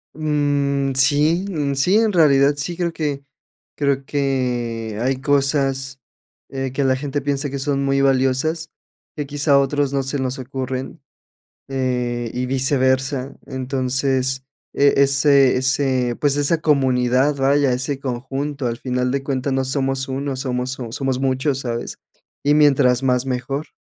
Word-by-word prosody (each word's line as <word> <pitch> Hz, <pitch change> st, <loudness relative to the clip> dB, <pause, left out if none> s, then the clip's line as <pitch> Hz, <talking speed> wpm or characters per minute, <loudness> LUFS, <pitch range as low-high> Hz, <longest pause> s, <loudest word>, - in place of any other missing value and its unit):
Mm, 145 Hz, -2 st, 0 dB
sí 145 Hz, +6 st, +3 dB
mm, 145 Hz, -6 st, -1 dB
sí, 160 Hz, +9 st, +2 dB
en 220 Hz, -2 st, +2 dB
realidad 145 Hz, -4 st, +5 dB
sí, 150 Hz, +4 st, -3 dB
creo 175 Hz, -2 st, -1 dB
que 145 Hz, -3 st, -3 dB, 0.5 s
creo 140 Hz, -2 st, 0 dB
que 120 Hz, -6 st, -2 dB
hay 130 Hz, +1 st, 0 dB
cosas, 135 Hz, -2 st, 0 dB, 0.5 s
eh, 135 Hz, -1 st, -4 dB
que 140 Hz, +1 st, -1 dB
la 130 Hz, -1 st, +2 dB
gente 145 Hz, +1 st, -3 dB
piensa 140 Hz, 0 st, -1 dB
que 140 Hz, -, -4 dB
son 140 Hz, 0 st, -1 dB
muy 135 Hz, 0 st, +1 dB
valiosas, 135 Hz, +4 st, +1 dB, 0.5 s
que 150 Hz, -, -2 dB
quizá 145 Hz, 0 st, +2 dB
otros 140 Hz, 0 st, +1 dB
no 140 Hz, -1 st, 0 dB
se 135 Hz, +1 st, -3 dB
nos 130 Hz, 0 st, -2 dB
ocurren, 130 Hz, +3 st, -5 dB, 0.7 s
eh, 125 Hz, -3 st, -2 dB
y 125 Hz, +1 st, -2 dB
viceversa, 130 Hz, 0 st, 0 dB
entonces, 130 Hz, 0 st, -1 dB, 0.3 s
eh, 140 Hz, 0 st, +3 dB
ese 140 Hz, -1 st, +4 dB
ese 130 Hz, -2 st, 0 dB
pues 145 Hz, -1 st, +1 dB
esa 145 Hz, +3 st, +1 dB
comunidad, 130 Hz, -1 st, +2 dB
vaya, 140 Hz, 0 st, +2 dB
ese 135 Hz, +2 st, -3 dB
conjunto 135 Hz, +2 st, -4 dB
al 115 Hz, -1 st, -2 dB
final 125 Hz, 0 st, -1 dB
de 135 Hz, 0 st, -1 dB
cuentas 135 Hz, 0 st, -2 dB
no 135 Hz, 0 st, 0 dB
somos 135 Hz, 0 st, -1 dB
uno, 135 Hz, 0 st, -3 dB
somos 125 Hz, -1 st, -2 dB, 0.2 s
somos 135 Hz, 0 st, -2 dB
muchos, 135 Hz, +1 st, 0 dB
¿sabes? 120 Hz, -2 st, -4 dB, 0.4 s
Y 145 Hz, +1 st, +3 dB
mientras 135 Hz, -4 st, +4 dB
más, 125 Hz, -1 st, +1 dB
mejor. 135 Hz, +3 st, -3 dB
135 Hz, 145 wpm, -20 LUFS, 130-145 Hz, 0.7 s, realidad